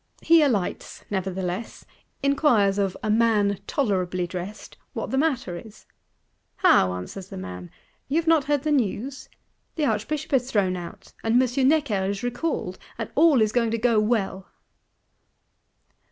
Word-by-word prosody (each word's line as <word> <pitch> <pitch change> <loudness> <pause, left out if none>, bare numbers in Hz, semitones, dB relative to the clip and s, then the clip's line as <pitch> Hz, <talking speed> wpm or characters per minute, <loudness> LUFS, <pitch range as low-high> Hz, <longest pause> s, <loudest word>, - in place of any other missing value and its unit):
He 330 0 +6
alights 230 -11 -1
nevertheless; 190 +1 -3 0.4
inquires 240 -9 +3
of 195 -2 0
a 215 - +1
"man 210 -3 +2
tolerably 185 -8 0
dressed," 180 +4 -7 0.2
what - - -4
the 265 - 0
matter 260 - 0
is?—'How?' 190 - -1
answers 90 - -7
the - - -9
man, 90 -1 -7 0.4
'you 275 - -2
have 330 0 +2
not 320 -4 +4
heard 290 -2 0
the 305 - 0
news? 255 +1 -1 0.5
The 310 - 0
Archbishop 290 +7 -2
is 255 -1 +2
thrown 195 -6 +1
out, 180 +3 -9
and 225 +2 +3
M. 255 +1 +2
Necker 275 -10 +2
is 200 +2 -3
recalled; 245 - -3 0.2
and 225 - -5
all 295 -6 +5
is 215 - 0
going 230 -1 +1
to 230 - -1
go 230 -1 +3
well! 210 -3 -1
220 Hz, 145 wpm, -25 LUFS, 190-270 Hz, 0.5 s, He